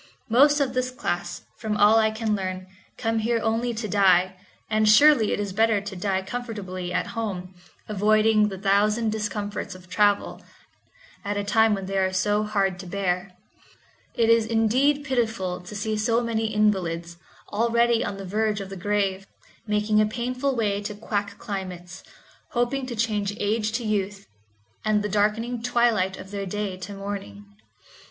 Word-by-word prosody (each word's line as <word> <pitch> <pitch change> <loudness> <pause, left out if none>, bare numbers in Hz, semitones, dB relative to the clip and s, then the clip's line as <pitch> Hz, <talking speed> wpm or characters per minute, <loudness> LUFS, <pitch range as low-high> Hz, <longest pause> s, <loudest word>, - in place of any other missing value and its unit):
Most 290 +5 +5
of 270 -3 0
this 255 0 0
class, 175 -8 -4 0.2
from 215 -2 -2
all 210 +2 +6
I 220 0 +3
can 220 -1 -1
learn, 185 -1 -4 0.3
come 225 -1 0
here 230 +1 +1
only 225 +2 0
to 220 0 -3
die, 185 -2 +4 0.3
and 215 0 +2
surely 250 -1 +6
it - - -1
is 200 -2 -3
better 220 0 +3
to 200 0 -7
die 190 +1 -1
comfortably 190 -6 -5
at - - -2
home, 190 -5 -4 0.3
avoiding 215 +1 +3
the 195 -2 -5
thousand 210 +3 +2
discomforts 210 -2 -4
of 185 0 -14
travel, 205 -1 +1 0.8
at 205 0 -2
a 205 - -1
time 220 +1 +3
when 195 -1 -5
they 195 0 -1
are 190 0 +1
so 205 +3 +1
heard 200 -4 0
to 185 - -8
bear. 180 0 -2 0.8
It 230 -3 +3
is 230 -1 +4
indeed 255 +6 +2
pitiful 220 -9 -1
to 180 +4 -10
see 215 +1 -2
so 225 +2 +1
many 225 -1 -1
invalids, 175 -6 0 0.4
already 235 +1 +2
on 195 - -4
the 195 - -7
verge 210 +2 0
of 195 -1 -7
the - - -5
grave, 195 0 -1 0.4
making 210 0 +2
a 215 - +3
painful 250 +4 -2
way 205 -3 0
to 205 0 -5
quack 205 -1 -3
climates, 185 -3 -6 0.5
hoping 255 +2 0
to 240 - -5
change 210 -2 -1
age 215 +1 0
to 235 +1 -1
youth, 205 -2 -2 0.6
and 215 -1 +1
the 210 - -2
darkening 215 +4 0
twilight 230 -6 +1
of 190 +1 -10
their 200 -1 -4
day 205 0 -3
to 200 +2 -8
morning. 195 - -6
210 Hz, 165 wpm, -25 LUFS, 195-225 Hz, 0.8 s, all